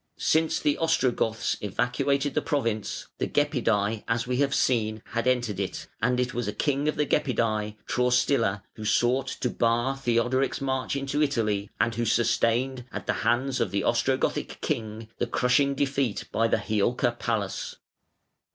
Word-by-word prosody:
Since 160 0 +2
the 145 - +1
Ostrogoths 130 -8 +1
evacuated 125 +6 0
the - - +1
province 115 -9 -2
(473), 145 -3 0
the 115 - +2
Gepidæ, 105 +1 0
as 115 0 0
we 125 0 -1
have 140 0 +2
seen, 110 -3 +1
had 115 +1 -1
entered 120 -6 +1
it, 100 - -3 0.2
and 125 0 +2
it 125 0 0
was 120 -3 -2
a 105 - -2
king 145 0 0
of 155 - +1
the 150 - +1
Gepidæ, 110 -6 0
Traustila, 125 -5 +1
who 110 - -9
sought 125 +5 +2
to 125 - -2
bar 120 +3 +1
Theodoric's 130 +1 +1
march 130 -1 -1
into 140 +2 -1
Italy, 105 -8 0
and 115 +1 +2
who 120 +1 -1
sustained 120 +3 +1
at - - -6
the - - +1
hands 130 +2 +1
of 105 - +1
the 100 +1 -1
Ostrogothic - - 0
king 110 0 -3
the 120 - 0
crushing 140 +4 +2
defeat 135 -5 0
by 115 +1 +2
the - - +2
Hiulca 120 +3 0
Palus 105 -5 -2
(488). - - -29
120 Hz, 165 wpm, -27 LUFS, 110-135 Hz, 0.2 s, Since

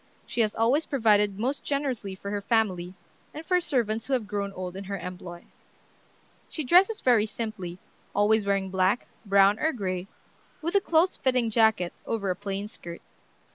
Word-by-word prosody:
She 235 - -1
has 215 -2 +1
always 250 +8 +2
provided 210 -7 +3
most 260 +6 -2
generously 260 -9 -2
for 200 +1 -7
her 205 0 -2
family, 190 -5 0 0.4
and 310 +2 -7
for 360 +1 +2
servants 230 -9 -1
who 275 - -1
have 245 -4 +1
grown 200 -1 -3
old 185 -1 -6
in 195 +1 -6
her 200 +1 -4
employ. 180 -1 -8 1.0
She 310 - -4
dresses 370 - +4
very 230 -4 +4
simply, 210 -6 -5 0.4
always 210 +1 +3
wearing 195 -1 0
black, 190 +4 +1 0.2
brown, 200 +1 +5
or 315 - +2
gray, 185 -5 -3 0.5
with 335 +2 -3
a 400 - +4
close 340 +1 +2
fitting 250 -3 +1
jacket 220 -6 +3
over 200 -4 -1
a - - -2
plain 200 +1 -4
skirt. 170 -5 -9
210 Hz, 170 wpm, -27 LUFS, 195-250 Hz, 1.0 s, brown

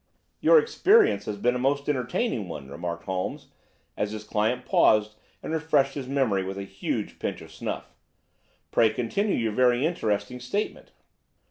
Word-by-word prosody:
"Your - - +6
experience 440 -1 +4
has 105 -1 -4
been 120 +4 +2
a 125 - -2
most 140 +2 0
entertaining 135 - -1
one," 70 -5 -8
remarked 85 +2 -5
Holmes 95 -1 -4 0.5
as 105 0 -2
his 110 -1 -6
client 105 +3 -1
paused 105 0 +4 0.3
and - - -4
refreshed 150 -4 +2
his 135 -3 -5
memory 130 -8 +1
with 95 +1 -5
a 100 - -4
huge 95 0 -4
pinch - - -3
of - - -12
snuff. - - -5 0.8
"Pray 115 -1 +4
continue 125 - -1
your 115 -2 0
very 125 +4 +3
interesting 125 -6 -1
statement." 160 - -4
125 Hz, 155 wpm, -26 LUFS, 105-145 Hz, 0.8 s, Your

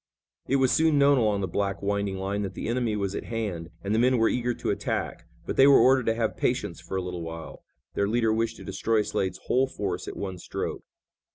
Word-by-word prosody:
It 135 - +2
was 130 -2 +3
soon 160 -2 +3
known 140 -1 +5
along 105 -3 +1
the 95 - -1
black, 100 +2 -2
winding 100 -1 -1
line 100 +2 -2
that 95 -2 -4
the - - -4
enemy 120 -2 0
was 100 -2 -2
at - - -4
hand, 100 -8 -4
and 100 +1 -1
the 110 - +3
men 125 +1 +4
were 115 -1 +4
eager 120 -1 -1
to - - -2
attack, - - -3 0.2
but - - -4
they 135 - +7
were 140 - +8
ordered 130 -1 +4
to 115 - +2
have 115 -1 -1
patience - - -1
for 95 - -4
a - - 0
little 90 -1 -5
while. 80 -1 -8 0.3
Their 100 - +1
leader 115 0 +2
wished 115 +1 -1
to - - -10
destroy 110 -1 0
Slade's 95 -2 -2
whole 130 +1 +2
force 95 -7 -4
at - - -6
one 95 -2 -5
stroke. - - -4
105 Hz, 235 wpm, -27 LUFS, 95-120 Hz, 0.3 s, were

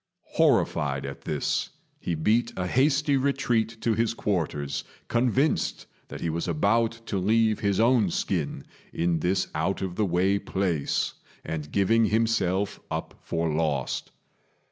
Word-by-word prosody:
Horrified 70 -2 +2
at 70 0 -7
this, 75 -2 -1 0.3
he 85 - -2
beat 110 +9 +2
a 90 - -1
hasty 140 +6 +2
retreat 120 -4 0
to 115 - +2
his 115 +1 0
quarters, 75 -9 -2 0.2
convinced 125 +5 +1 0.2
that - - -8
he 85 - -1
was 85 +3 -2
about 105 +8 +2
to 100 - -2
leave 110 +3 +2
his 100 -1 +1
own 115 -3 +4
skin 70 - -2 0.3
in 85 -1 0
this 90 +3 +1
out 90 +6 -1
of 95 -2 -3
the 105 - +2
way 95 +3 +2
place, 95 -6 -1 0.3
and 75 -2 -4
giving 110 +3 +3
himself 105 -3 +1
up - - -4
for 80 -2 -1
lost. 75 -5 -1
95 Hz, 140 wpm, -26 LUFS, 80-115 Hz, 0.3 s, own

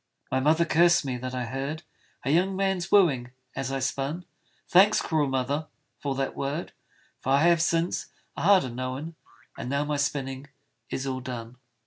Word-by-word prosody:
My 130 - +2
mother 155 +5 +3
cursed 170 -1 +4
me 130 -2 -2
that 130 +1 -5
I 125 -1 -2
heard 135 +6 -4 0.4
A 135 - +1
young 185 +4 +2
man's 190 -2 -1
wooing 135 -11 +4 0.2
as 135 0 -3
I 135 - -1
spun: 140 +6 -2 0.4
Thanks, 195 +4 +6
cruel 155 -3 +1
mother, 135 +4 -1 0.3
for 140 -2 -2
that 135 0 -2
word, 145 +5 -3 0.5
For 135 - 0
I 140 +2 +4
have, 170 -1 +5
since, 165 +1 0 0.3
a - - -5
harder 185 -9 +4
known! 130 +6 -4 0.5
And - - -4
now 140 +2 0
my 150 0 -1
spinning 140 -1 -2 0.4
is 135 - -3
all 130 -1 -2
done. 125 -1 -7
140 Hz, 170 wpm, -27 LUFS, 130-170 Hz, 0.5 s, Thanks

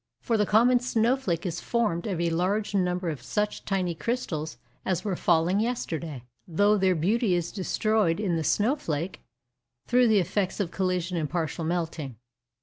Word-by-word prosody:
For 230 - 0
the 210 -2 +2
common 240 +4 +5
snow 240 0 +2
flake 180 -11 -2
is 175 -1 -3
formed 220 -7 0
of 185 -5 -2
a 170 -1 +1
large 195 +6 0
number 180 -2 0
of 145 -5 -7
such 210 - -2
tiny 185 -3 0
crystals 160 - -3 0.3
as 185 +1 -1
were 195 -3 0
falling 175 +3 +2
yesterday; 165 - -3 0.2
though 205 +5 +3
their 190 -2 +2
beauty 195 +4 +2
is 175 -1 -2
destroyed 205 -2 +1
in 190 -5 0
the 160 - -1
snow 215 - +2
flake, 165 - -4 0.6
through 250 0 +4
the 220 -2 +4
effects 190 +1 0
of 185 -4 -1
collision 180 -2 -1
and 155 -3 -1
partial 165 -1 -2
melting. 160 -6 -3
185 Hz, 170 wpm, -27 LUFS, 165-215 Hz, 0.6 s, common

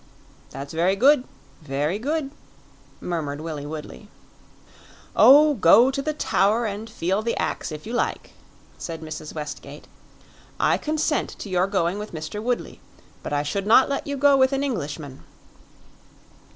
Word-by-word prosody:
"That's 140 +2 -8
very 175 +4 +2
good 260 +4 +4 0.4
very 150 +6 -2
good," 285 +3 -2 0.7
murmured 150 -5 -3
Willie 155 -2 -6
Woodley. 155 +7 -8 1.1
"Oh, 295 +3 +7
go 235 +3 +6
to 275 +1 -2
the 310 - -1
Tower, 220 -3 +1
and 215 +1 -5
feel 190 -1 -1
the 230 +1 -2
ax, - - -2
if 155 0 -8
you 230 - -6
like," 240 - -2 0.5
said 165 -2 -6
Mrs. 155 0 -7
Westgate. 150 -1 -7 0.7
"I - - +2
consent 310 0 -1
to 205 - -8
your 185 0 +1
going 190 -1 0
with 210 -2 -7
Mr. 160 +7 -5
Woodley; 245 +2 -3 0.4
but - - -6
I 145 0 0
should 195 +7 -3
not 235 +5 +6
let 280 +1 -3
you 285 0 -3
go 285 +1 +5
with 260 0 +3
an 275 +1 0
Englishman." 145 - -4
200 Hz, 150 wpm, -23 LUFS, 155-260 Hz, 1.1 s, Oh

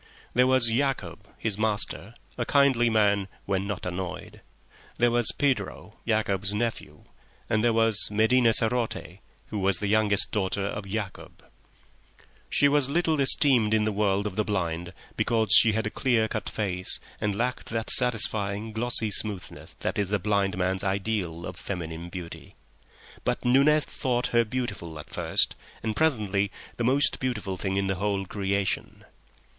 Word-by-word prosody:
There 125 +1 +3
was 130 -3 +4
Yacob, 135 +3 -2
his 110 -2 -3
master, 110 0 -2 0.2
a 120 - -2
kindly 130 -3 +3
man 100 -3 +2 0.2
when 95 0 -2
not 100 -2 -5
annoyed; 90 0 -6 0.6
there 120 0 +3
was 120 -1 +4
Pedro, 105 -6 -2
Yacob's 105 -3 -1
nephew; 115 +1 -4 0.4
and 110 0 0
there 120 - +3
was 115 -2 +3
Medina 115 +3 +3
sarote, 115 +1 0 0.3
who 105 - -4
was 95 -1 +3
the 105 - -2
youngest 105 -1 +3
daughter 100 -1 -1
of 100 0 -5
Yacob. 100 -1 -6 1.1
She 145 - +3
was 140 -2 +2
little 160 -1 +1
esteemed 125 -5 +6
in 110 - +1
the 110 - 0
world 100 -1 0
of 100 -2 -5
the 110 - +2
blind, 85 -4 -3 0.3
because 110 -4 +1
she 110 0 +7
had 110 0 -1
a 110 - -3
clear 120 -4 +1
cut - - -4
face 95 -4 -2 0.2
and 105 -2 -1
lacked 125 +4 -3
that 115 -1 0
satisfying, 110 -3 +2
glossy 110 -1 +2
smoothness 100 -2 -5
that - - -2
is 100 -2 -1
the 105 - +1
blind 100 -2 -1
man's 95 +1 -1
ideal 95 -4 -2
of 90 - -7
feminine 85 -3 -6
beauty, 85 -1 -9 0.7
but - - -2
Nunez 140 +5 +4
thought 125 -3 -2
her 115 0 +4
beautiful 105 -9 -5
at 75 - -11
first, - - +1 0.3
and 110 -1 -2
presently 105 -10 0 0.3
the 120 - -2
most 135 +4 +2
beautiful 110 -7 -3
thing 95 +1 -3
in 100 - 0
the 95 -1 -2
whole 100 -1 -1
creation. 100 0 -3
105 Hz, 155 wpm, -26 LUFS, 100-120 Hz, 1.1 s, she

